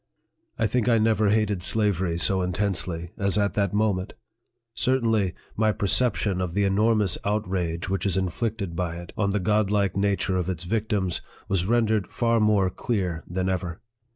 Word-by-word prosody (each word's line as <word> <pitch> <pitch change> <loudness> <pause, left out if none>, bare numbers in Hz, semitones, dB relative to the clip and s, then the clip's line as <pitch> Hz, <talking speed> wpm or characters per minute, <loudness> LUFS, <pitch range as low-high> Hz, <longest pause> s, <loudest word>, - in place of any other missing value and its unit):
I 115 - +1
think 125 +2 +1
I 115 - +5
never 110 -1 +3
hated 105 -3 +1
slavery 95 -4 0
so 95 +2 +2
intensely 90 -2 -2
as 100 0 +1
at 100 -1 +1
that 100 -3 0
moment; 100 -3 0 0.6
certainly, 115 -8 +1 0.2
my 110 0 +2
percep 105 +3 +2
tion 95 -3 -1
of 90 -1 -3
the 100 - +2
enormous 105 0 +2
outrage 90 -5 -1
which 95 +1 -1
is 95 - 0
inflicted 95 0 -2
by 85 -1 -2
it, 85 0 -9
on 105 -3 0
the 100 +1 0
godlike 105 -1 +1
nature 100 -1 +1
of 90 0 -1
its 90 -3 -3
victims, 105 -2 -1 0.3
was 95 -2 0
rendered 110 -4 +2
far 115 +2 +1
more 105 -3 +3
clear 90 -7 -2
than 90 +1 -2
ever. 90 -2 -2
100 Hz, 165 wpm, -25 LUFS, 90-110 Hz, 0.6 s, I